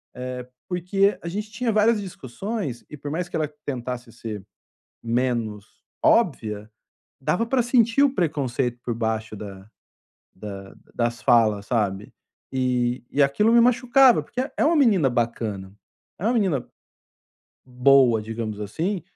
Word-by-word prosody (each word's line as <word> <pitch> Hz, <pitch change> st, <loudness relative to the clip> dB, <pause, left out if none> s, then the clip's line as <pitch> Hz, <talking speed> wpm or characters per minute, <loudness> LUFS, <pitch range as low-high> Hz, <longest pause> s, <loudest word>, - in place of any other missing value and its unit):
eh, 125 Hz, 0 st, -6 dB, 0.2 s
porque 195 Hz, +3 st, +1 dB
a 170 Hz, -, -7 dB
gente 210 Hz, +5 st, -4 dB
tinha 230 Hz, +1 st, -1 dB
várias 215 Hz, +1 st, +3 dB
discussões, 190 Hz, -, -5 dB
e -, -, -6 dB
por 145 Hz, +1 st, -6 dB
mais 175 Hz, +2 st, -2 dB
que -, -, -6 dB
ela 155 Hz, -2 st, -1 dB
tentasse 125 Hz, -2 st, -5 dB
ser 110 Hz, -4 st, -7 dB, 0.6 s
menos 115 Hz, -3 st, -1 dB, 0.4 s
óbvia, 110 Hz, -, +1 dB, 0.5 s
dava 220 Hz, +11 st, 0 dB
pra 250 Hz, 0 st, +2 dB
sentir 240 Hz, +2 st, +3 dB
o 280 Hz, -2 st, +4 dB
preconceito 135 Hz, -, -1 dB
por 120 Hz, -, -2 dB
baixo, 110 Hz, -1 st, -2 dB
da 100 Hz, -1 st, -9 dB, 0.7 s
da 95 Hz, -1 st, -9 dB, 0.2 s
das 120 Hz, 0 st, -1 dB
falas 110 Hz, -4 st, +3 dB
sabe. 105 Hz, -4 st, -1 dB, 0.4 s
E 125 Hz, -1 st, 0 dB
e 145 Hz, -, +2 dB
aquilo 210 Hz, +12 st, +3 dB
me 235 Hz, -, +7 dB
machucava, 250 Hz, +1 st, +5 dB
porque 250 Hz, -, -5 dB, 0.2 s
é -, -, +2 dB
uma 330 Hz, 0 st, +3 dB
menina 205 Hz, -, +4 dB
bacana, 115 Hz, -5 st, -2 dB, 0.5 s
é 185 Hz, -, -6 dB
uma 245 Hz, -, +2 dB
menina 185 Hz, -, +1 dB, 1.0 s
boa, 125 Hz, -3 st, +4 dB
digamos, 110 Hz, -1 st, -5 dB
assim, 165 Hz, -, -2 dB
130 Hz, 140 wpm, -24 LUFS, -, 1.0 s, me